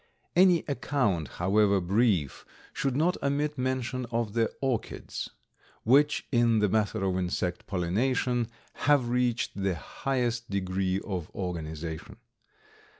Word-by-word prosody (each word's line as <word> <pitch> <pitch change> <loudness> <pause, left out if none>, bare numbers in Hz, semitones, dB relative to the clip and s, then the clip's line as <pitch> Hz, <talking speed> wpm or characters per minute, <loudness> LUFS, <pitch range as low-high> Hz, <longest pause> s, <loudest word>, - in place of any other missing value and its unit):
Any 180 -1 +5
account, 125 - 0
however 100 +2 +2
brief, 95 - +1 0.3
should 135 -2 -1
not 165 +5 +1
omit 145 +2 0
mention 130 -1 -2
of 115 -3 -2
the 115 -1 +1
orchids, 130 -4 -3 0.5
which 145 +5 +4
in 120 -3 +4
the 105 -1 +3
matter 105 -1 0
of 95 -1 +1
insect 90 0 -2
pollination 115 +6 0 0.4
have 140 -5 +4
reached 125 -1 +1
the 95 -2 -1
highest 120 - -2
degree 95 -1 0
of 90 -6 -4
organization. 80 -2 -5
115 Hz, 115 wpm, -28 LUFS, 95-130 Hz, 0.5 s, Any